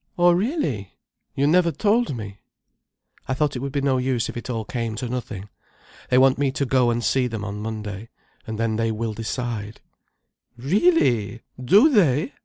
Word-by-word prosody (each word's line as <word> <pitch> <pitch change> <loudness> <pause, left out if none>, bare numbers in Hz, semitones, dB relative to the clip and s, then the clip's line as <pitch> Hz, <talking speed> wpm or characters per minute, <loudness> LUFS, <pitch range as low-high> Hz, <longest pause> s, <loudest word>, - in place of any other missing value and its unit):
"Oh 175 0 +5
really! 175 - -1 0.4
You 140 - +1
never 170 +3 +4
told 210 - +1
me." 100 -2 -8 0.9
"I 130 - -1
thought 145 0 0
it - - -3
would 135 +2 -4
be 140 0 -1
no 135 -2 +1
use 125 0 -1
if - - -7
it 120 - -6
all 115 -3 -3
came 115 -1 -3
to 125 - -4
nothing. 115 -5 -5 0.6
They 125 - +3
want 130 0 +4
me 140 -1 +2
to 140 - -1
go 125 -1 +2
and 120 0 -1
see 130 0 +2
them 110 -4 -5
on 105 0 -5
Monday, 105 -1 -6 0.4
and 110 -1 -4
then 110 -1 0
they 115 0 0
will 110 0 -3
decide—" 115 -1 -4 0.8
"Really! 130 - +2 0.2
Do 200 - +6
they! 180 - +2
125 Hz, 180 wpm, -23 LUFS, 110-140 Hz, 0.9 s, Do